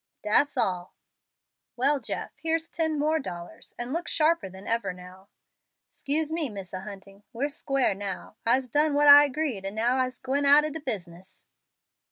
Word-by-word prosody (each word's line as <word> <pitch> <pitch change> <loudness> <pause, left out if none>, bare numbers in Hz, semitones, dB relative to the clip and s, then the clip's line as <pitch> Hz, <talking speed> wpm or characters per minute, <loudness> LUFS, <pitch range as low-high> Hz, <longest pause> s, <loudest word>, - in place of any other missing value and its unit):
"Dat's 215 +7 +2
all." 180 -1 -1 0.8
"Well, 275 +4 +2
Jeff, - - -5
here's 325 +1 -1
ten 320 -2 -1
dollars 285 - -4
more, 240 - -3
and 250 - -6
look 340 +2 -3
sharper 320 - +1
than 190 +1 -13
ever 225 -5 -1
now." 180 +2 -14 0.6
"'Scuse 305 +2 -1
me, 320 -4 -1
Misser 195 -3 -7
Hunting. 195 0 -11
We'se 280 +5 -3
squar' 275 -6 +1
now. 195 +1 -7
I'se 255 +3 +2
done 295 +3 +2
what 295 0 +4
I 290 0 +10
agreed, 280 -7 -3
and 195 +2 -5
now 240 +4 +1
I'se 255 0 -1
gwine 270 +2 -1
out 290 +2 +6
ob 305 - -4
de 320 - -5
business." 190 - -7
255 Hz, 170 wpm, -26 LUFS, 195-295 Hz, 0.8 s, I